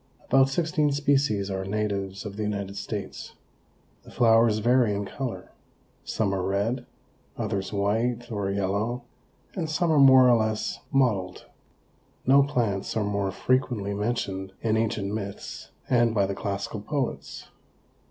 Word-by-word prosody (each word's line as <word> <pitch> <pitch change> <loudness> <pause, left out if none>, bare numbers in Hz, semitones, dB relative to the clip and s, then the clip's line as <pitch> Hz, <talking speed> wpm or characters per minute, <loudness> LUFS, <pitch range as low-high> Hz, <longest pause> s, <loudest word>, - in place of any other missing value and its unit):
About 135 +1 +4
sixteen 155 0 +1
species 140 -8 +1
are 95 0 -2
natives 100 -1 -3
of 100 -1 -6
the 110 - -4
United 100 -2 -3
States. 105 -1 -6 0.7
The - - -16
flowers 115 -2 +4
vary 120 -1 +3
in 100 0 -2
color. 130 +4 -6 0.5
Some 100 -3 -1
are 95 - -1
red, 105 +7 -1 0.5
others 105 -4 -2
white 115 +4 -1
or 100 -3 -2
yellow 100 +5 -1 0.5
and 165 -5 -3
some 165 +2 +1
are 155 - +4
more 130 -2 +8
or 120 -1 +6
less 110 0 -2
mottled. 105 -9 +1 0.8
No 135 +2 +6
plants 115 -9 -1
are 110 - +1
more 100 -1 -1
frequently 120 -3 0
mentioned 100 -3 -2
in 110 -1 +1
Ancient 105 -2 -1
Myths 100 -2 -6 0.2
and 120 -2 +3
by 100 -2 +3
the 100 - -2
classical 100 +2 -4
poets. 135 +3 -4
110 Hz, 140 wpm, -26 LUFS, 100-125 Hz, 0.8 s, more